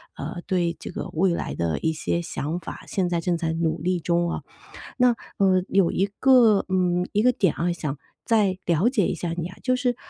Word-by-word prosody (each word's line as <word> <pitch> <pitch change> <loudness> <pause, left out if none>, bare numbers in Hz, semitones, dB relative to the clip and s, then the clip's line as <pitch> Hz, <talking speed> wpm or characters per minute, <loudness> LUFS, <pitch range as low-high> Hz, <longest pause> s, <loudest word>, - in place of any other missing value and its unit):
呃， 175 - -6
对 175 -3 0
这 - - -7
个 - - -5
未 180 +3 +2
来 - - -4
的 85 -2 -1
一 160 0 0
些 170 +2 -1
想 160 +1 -3
法， 165 - -9
现 190 -2 0
在 170 -1 -1
正 175 0 0
在 165 -1 -2
努 165 0 -1
力 180 +1 0
中 170 +1 0 0.2
啊。 - - -3 0.6
那， 250 -1 +5 0.3
呃， 185 -2 +3
有 190 -3 +3
一 195 - +1
个， 240 -6 +5
嗯， 180 -1 +1
一 210 - +3
个 250 - +5
点 190 -8 +1
啊， 175 +1 0
想 150 -4 -4 0.3
再 205 -5 +2
了 170 +6 +2
解 225 -8 +1
一 - - -2
下 170 -2 -3
你 170 -1 -3
啊， 185 - -13
就 255 -1 +2
是 250 -1 0
180 Hz, 230 characters per minute, -24 LUFS, 170-200 Hz, 0.6 s, 那